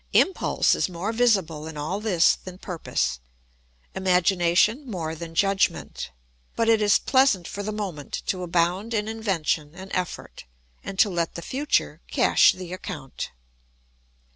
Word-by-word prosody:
Impulse 380 - +3
is - - 0
more 185 +5 -3
visible 190 -10 +1
in 160 -1 -8
all 155 +7 -2
this 185 -6 +4
than 185 -1 -11
purpose, 65 - -2 0.7
imagination 185 - +2
more 165 -6 -3
than 165 0 -8
judgment; 195 - 0 0.5
but 230 - +1
it 225 -1 +4
is 205 -1 +5
pleasant 260 -10 +3
for 205 - -5
the 210 +1 -3
moment 190 -9 -5
to 185 - -2
abound 180 +6 0
in 210 0 0
invention 175 -8 -1
and 190 +1 -10
effort 180 - -4 0.4
and 195 - -6
to 210 - +5
let 170 -4 -2
the 170 - -6
future 270 - -1
cash 65 - +5
the 185 -1 -8
account. 155 -7 -6
185 Hz, 140 wpm, -25 LUFS, 170-210 Hz, 0.7 s, is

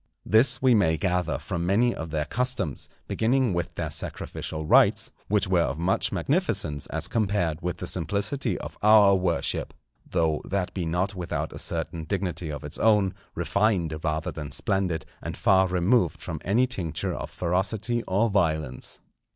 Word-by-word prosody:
This 125 +4 +4
we 130 -1 +6
may 80 -7 +3
gather 90 +2 0
from 85 - -4
many 110 +7 +3
of 80 - -6
their 75 -1 -1
customs, 110 - -2 0.2
beginning 120 -1 +1
with 85 -1 -3
their - - -3
sacrificial 80 0 -5
rites, - - +4 0.2
which 100 -2 +2
were 90 -2 +3
of 70 -2 -1
much 85 +3 +1
magnificence 75 -2 0
as - - -3
compared 95 -7 0
with 90 0 -3
the - - -5
simplicity 100 - -1
of - - -8
our 105 -2 +7
worship, 90 -3 -1 0.3
though 80 -2 +1
that 95 -1 -2
be 90 -4 -2
not 90 +5 0
without 90 -3 -4
a - - -6
certain 80 -1 -3
dignity 90 -3 -3
of 75 +1 -6
its 75 - -5
own, 105 -3 +3 0.2
refined 85 -1 +1
rather 80 0 -1
than 75 -3 -6
splendid, 95 -4 -1 0.2
and - - -5
far 95 -1 +4
removed 90 - +2
from 80 -2 -6
any 115 +7 +3
tincture 95 - -3
of - - -5
ferocity 100 +6 -1
or 100 +5 +2
violence. 80 - -1
90 Hz, 160 wpm, -26 LUFS, 80-105 Hz, 0.3 s, our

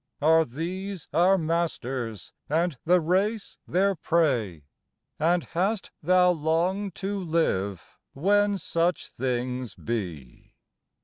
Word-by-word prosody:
Are 160 +2 +5
these 175 +6 -5
our 185 +3 +5
masters 135 - -2 0.2
and 165 +1 +1
the 180 +2 +5
race 195 +6 0
their 195 +3 +2
prey, 130 - 0 0.6
And 170 +2 +2
hast 195 +5 -1
thou 180 +2 +4
long 175 +5 0
to 200 +3 -3
live 130 - -1
when 205 +6 +2
such 170 -1 0
things 125 -3 -3
be? 90 - -6
165 Hz, 105 wpm, -26 LUFS, 130-185 Hz, 0.6 s, Are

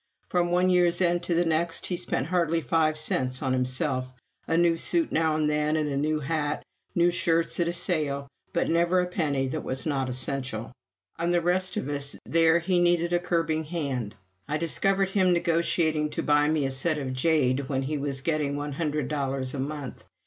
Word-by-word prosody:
From 175 -1 +1
one 180 +1 +3
year's 175 -1 +3
end 175 -1 +2
to 170 - 0
the 175 +1 +2
next, 165 +1 0
he 180 - -1
spent 175 -7 0
hardly 170 -1 +1
five 160 -1 +1
cents 130 -4 -1
on 130 -1 0
himself 130 0 -1 0.4
a 165 - +1
new 170 -1 +4
suit 325 - +2
now 160 -1 +2
and 155 -1 +1
then, 150 +1 +1
a 150 -2 -1
new 155 +2 0
hat, 150 0 -2 0.3
new 175 0 +4
shirts 165 -1 0
at 170 - +2
a 170 - -1
sale, 155 -6 -1 0.2
but 170 - 0
never 170 +2 +2
a 180 - +2
penny 150 -7 -1
that - - -3
was 130 0 -4
not 135 -4 -1
essential. 130 -3 -4 0.5
On 170 +1 0
the 175 0 +3
rest 180 +2 0
of - - -2
us 140 -1 -1
there 165 0 +4
he 175 +1 +1
needed 175 0 +2
a 175 - +3
curbing 165 -3 -1
hand! 140 -10 -3 0.3
I 150 +1 -1
discovered 190 +6 +1
him 185 -2 +3
negotiating 165 -2 +1
to - - 0
buy 145 0 +3
me 155 -2 +1
a 135 - -1
set 150 +4 0
of 135 -3 -3
jade 135 -2 +1
when 135 -1 -1
he 145 +2 -2
was 140 -1 -3
getting 150 -2 0
one 145 0 -4
hundred 150 -2 -2
dollars 135 -2 -2
a 140 - -4
month. 140 -1 -5
155 Hz, 200 wpm, -26 LUFS, 140-170 Hz, 0.5 s, new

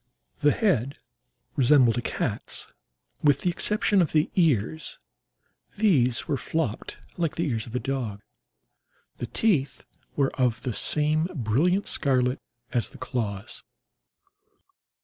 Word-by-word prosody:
The 145 0 +4
head 140 - +1 0.6
resembled 130 -3 +5
a 120 - -1
cat's, - - -3 0.6
with 145 -2 +4
the 180 - +1
exception 205 +2 +3
of 165 - 0
the 155 0 +2
ears—these 160 - -1
were 145 -4 0
flopped 145 -6 -3 0.2
like 165 -3 -1
the 170 -1 -1
ears 115 -4 -2
of 120 - -8
a - - +1
dog. 120 -6 -4 0.9
The 120 - -4
teeth 140 - 0 0.3
were 140 -2 +1
of 120 -3 +1
the 125 - -2
same 155 +6 +1
brilliant 150 - +1
scarlet 130 -2 +1 0.3
as 120 -3 +1
the - - -14
claws. 105 -6 -4
140 Hz, 120 wpm, -26 LUFS, 120-160 Hz, 0.9 s, resembled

